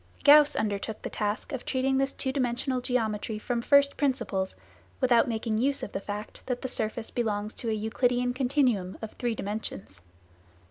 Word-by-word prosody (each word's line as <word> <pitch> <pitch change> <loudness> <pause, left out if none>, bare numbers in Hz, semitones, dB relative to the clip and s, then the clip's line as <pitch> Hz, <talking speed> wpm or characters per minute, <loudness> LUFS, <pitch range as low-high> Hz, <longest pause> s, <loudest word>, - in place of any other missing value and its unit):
Gauss 295 0 +7
undertook 210 0 -2
the - - -4
task 210 +5 -2
of 265 -3 -4
treating 265 +1 +1
this 270 0 +1
two 265 - -2
dimensional 255 -1 -1
geometry 220 -3 -1
from 235 +2 -2
first 280 +2 +4
principles, 235 -9 0 0.4
without 245 -2 +4
making 220 -1 -1
use 275 +3 0
of - - -5
the - - -3
fact 205 +2 -6
that 250 0 -2
the - - -1
surface 220 -2 -3
belongs 215 -3 -1
to 230 - -4
a - - +1
Euclidean 245 +3 +1
continuum 250 -8 +1
of 220 - -5
three 240 -2 -2
dimensions. 205 - -6
240 Hz, 170 wpm, -28 LUFS, 215-260 Hz, 0.4 s, Gauss